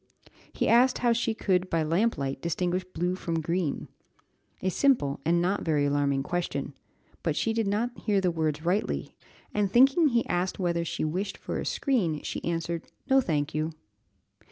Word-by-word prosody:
He - - -1
asked 250 +2 +5
how 240 -1 +3
she 230 -1 0
could 185 -3 +1
by 165 -1 +1
lamplight 155 -6 0
distinguish 180 +2 -1
blue 180 0 -2
from 170 -3 -2
green? 165 -1 -2 0.8
a 190 - +2
simple 210 - +2
and 170 +2 +3
not 185 +4 0
very 150 -3 +1
alarming 140 -1 +1
question, 175 +2 -3 0.5
but - - 0
she 225 - 0
did 225 -2 0
not 230 +5 0
hear 205 -5 +1
the 185 -2 +1
words 155 -1 -2
rightly, 190 +5 -1 0.4
and 205 -2 +1
thinking 270 - +6
he 235 -4 +2
asked 180 +1 -1
whether 170 -2 0
she 165 - -2
wished 190 +6 -2
for - - -4
a - - -4
screen, 185 - 0
she - - -4
answered 170 0 -2 0.3
"No, 270 0 +6
thank 150 - -1
you." 155 +1 -1
175 Hz, 170 wpm, -28 LUFS, 160-215 Hz, 0.8 s, thinking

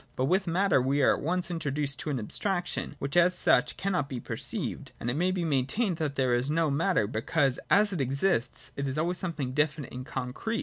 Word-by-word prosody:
But 130 - +1
with 185 +6 +2
matter 175 -4 +3
we 135 +2 +1
are - - +6
at - - -4
once 180 +2 -1
introduced 145 -3 -2
to - - -4
an 140 - 0
abstraction, 175 - -2
which 140 +2 -4
as 180 +1 +5
such 125 - +3
cannot 180 -7 -1
be 130 - -4
perceived: - - -5
and 120 - -1
it - - -3
may 175 +4 +2
be 185 -2 -1
maintained 160 - 0
that 150 -4 -2
there 130 -3 +2
is 120 +3 +1
no 160 -1 +2
matter, 165 - +2
because, 125 +4 0
as 205 0 +4
it 170 - -1
exists, 135 -1 0
it 140 0 -2
is 135 +2 -3
always 175 +3 0
something 155 -8 -3
definite 150 -1 0
and 125 +1 -7
concrete. 135 - -3
150 Hz, 215 wpm, -28 LUFS, 130-180 Hz, -, are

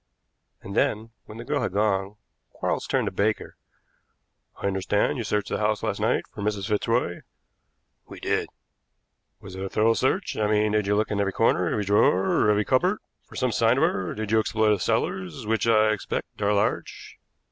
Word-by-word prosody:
And 100 - -7
then, 110 0 0
when 110 - -11
the 115 - -7
girl 145 0 -1
had 105 -7 -2
gone, 100 -1 0 0.3
Quarles - - -3
turned - - +1
to - - -2
Baker. 110 +2 -1 1.0
"I - - -5
understand 100 +7 0
you - - -2
searched 105 -1 -1
the - - -2
house 105 0 0
last 110 -3 -2
night - - +1
for - - -7
Mrs. 100 -1 -2
Fitzroy?" 105 -3 0 0.9
"We - - -10
did." - - -1 0.9
"Was 95 - -10
it 95 - -5
a 95 - -4
thorough 110 +3 +3
search 160 - 0
I 105 - +1
mean 105 0 +2
did 105 -1 +1
you 105 - +2
look 110 +1 0
into 100 -1 0
every 100 -1 -1
corner, 90 -5 +2
every 105 - -1
drawer, 100 0 +3
every 105 0 +2
cupboard 180 +11 +2 0.3
for - - -14
some 130 -2 0
sign 115 +2 +3
of - - +2
her? 95 -2 0
Did 110 0 -4
you 110 - +4
explore 110 0 +1
the 105 - +2
cellars, 90 +1 -2
which, 115 +1 0
I 110 -1 +4
expect, 105 0 -4
are 100 0 +2
large?" 100 -1 -2
105 Hz, 190 wpm, -25 LUFS, 100-110 Hz, 1.0 s, you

